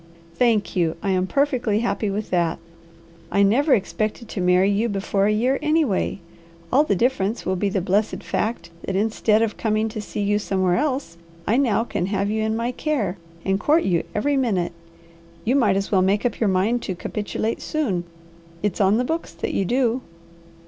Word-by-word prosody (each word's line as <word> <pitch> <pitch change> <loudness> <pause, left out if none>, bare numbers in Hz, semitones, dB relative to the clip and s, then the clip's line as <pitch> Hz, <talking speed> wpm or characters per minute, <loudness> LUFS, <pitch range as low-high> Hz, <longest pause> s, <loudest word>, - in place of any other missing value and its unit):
"Thank 230 -1 +1
you! 170 -3 +1
I 195 - +1
am 185 0 +1
perfectly 250 -5 +1
happy 230 -3 -1
with 205 +2 -4
that. 170 -2 +1 0.7
I 200 - +4
never 265 +9 +4
expected 215 +3 -3
to 190 - -3
marry 180 +2 +4
you 215 +4 +1
before 195 0 0
a - - +3
year, 250 +6 +1
anyway. 300 - +1 0.5
All 280 +4 +6
the 205 - +1
difference 230 -1 0
will 190 - 0
be 200 +2 0
the 195 -1 -1
blessed 200 +4 0
fact 215 -6 -2
that 190 - -3
instead 215 +1 +2
of 220 -2 -2
coming 220 0 0
to 215 0 -5
see 210 - -5
you 205 +1 +2
somewhere 185 -3 +1
else, 265 - -1 0.3
I 225 - +2
now 230 -5 +2
can 185 -6 -2
have 200 0 0
you 220 0 0
in 220 0 0
my 235 +2 -1
care, 240 - -2 0.3
and 195 0 +1
court 310 +9 +3
you 175 -3 +1
every 280 +7 +1
minute. 200 -10 0 0.7
You 245 +4 +2
might 215 -8 +3
as 195 - -2
well 190 -3 +4
make 200 +5 +1
up 240 - -1
your 220 - +2
mind 200 +6 +1
to 190 - -4
capitulate 215 +4 -3
soon. 225 - -1 0.6
It's 205 -1 0
on 195 +2 +4
the 250 - +1
books 325 - -3
that 165 - -4
you 195 - +1
do." 245 +3 +1
210 Hz, 190 wpm, -23 LUFS, 195-240 Hz, 0.7 s, All